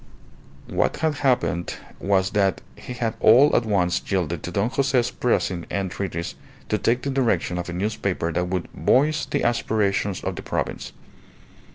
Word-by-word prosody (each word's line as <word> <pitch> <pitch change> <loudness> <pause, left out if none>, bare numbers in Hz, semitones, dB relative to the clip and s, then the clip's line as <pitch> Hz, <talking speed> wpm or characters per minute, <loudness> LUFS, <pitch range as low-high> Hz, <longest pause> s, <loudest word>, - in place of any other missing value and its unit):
_" - - -9
What - - +1
had 155 -3 0
happened 125 -10 +1 0.2
was 95 -1 +1
that 100 -2 +2 0.2
he 125 - -8
had 115 -2 -2
all 130 +7 +6
at 115 - +2
once 90 -4 +1
yielded 85 -4 0
to 90 - -5
Don 100 +6 0
Jose's 130 -3 +1
pressing 95 -7 0
entreaties 95 -3 -3 0.4
to 105 - +1
take 120 +2 +1
the 140 - -1
direction 115 -9 0
of 90 - -5
a - - -4
newspaper 95 -3 -1
that 90 +2 -1
would 90 -1 -2
"voice 150 +4 +2
the - - -1
aspirations 105 -4 0
of - - -2
the - - -6
province." - - -3
100 Hz, 165 wpm, -23 LUFS, 90-120 Hz, 0.4 s, all